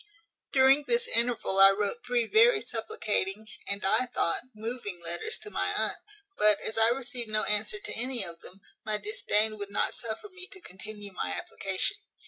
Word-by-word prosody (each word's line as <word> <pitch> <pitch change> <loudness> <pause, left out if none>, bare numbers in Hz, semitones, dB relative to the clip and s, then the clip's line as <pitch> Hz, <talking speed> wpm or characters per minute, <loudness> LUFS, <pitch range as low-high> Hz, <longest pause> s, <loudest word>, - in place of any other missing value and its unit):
"During 270 +2 +5
this 475 0 +2
interval 235 - +1
I 195 0 +10
wrote 205 +4 -1
three 245 -1 0
very 440 - +5
supplicating, 210 - -2 0.2
and, 200 0 -2
I 220 +6 +4
thought, 170 -8 +1
moving 215 -4 -4
letters 170 - -2
to 420 - -7
my - - -1
aunt; - - +1 0.4
but, 210 -1 +5
as 220 - -3
I 225 0 +5
received 245 -2 -2
no 215 0 +1
answer 210 - 0
to 415 - -5
any 245 -3 0
of 170 -1 -7
them, 190 +2 -12 0.2
my 215 -1 -1
disdain 215 +1 0
would 205 -1 -5
not 200 - 0
suffer 230 - -5
me 370 -1 -8
to 380 - -10
continue 205 - -9
my 90 - -3
application." 195 - -2
220 Hz, 175 wpm, -29 LUFS, 200-260 Hz, 0.4 s, I